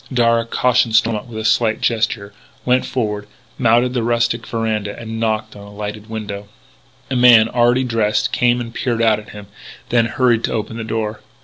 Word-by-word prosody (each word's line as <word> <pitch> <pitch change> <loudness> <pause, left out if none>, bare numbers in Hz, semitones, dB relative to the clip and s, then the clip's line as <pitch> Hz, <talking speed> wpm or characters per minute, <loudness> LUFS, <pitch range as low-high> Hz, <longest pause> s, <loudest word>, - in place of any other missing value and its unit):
Darragh, 115 -2 +2
cautioning 125 -2 +2
Stormont 110 0 +1
with 115 -2 -9
a 110 - -4
slight 110 0 +2
gesture, 110 -3 -1 0.3
went 125 +1 +2
forward, 105 -4 -3 0.3
mounted 120 +1 +3
the 125 - 0
rustic 115 0 0
veranda, 110 -3 -2
and 110 -1 -6
knocked 110 -1 -2
at 100 - -11
a - - -11
lighted 105 +1 -7
window. 105 -2 -6 0.6
A - - 0
man, 120 -3 +7
already 120 +2 +2
dressed, 105 -3 0
came 120 0 +2
and 115 -1 -6
peered 115 -2 -1
out 110 -2 +3
at 105 - -13
him, 105 -1 -10 0.4
then 120 -1 +3
hurried 120 -2 +1
to - - -3
open 115 0 -4
the 115 - -4
door. 110 -1 -3
115 Hz, 185 wpm, -18 LUFS, 110-120 Hz, 0.6 s, man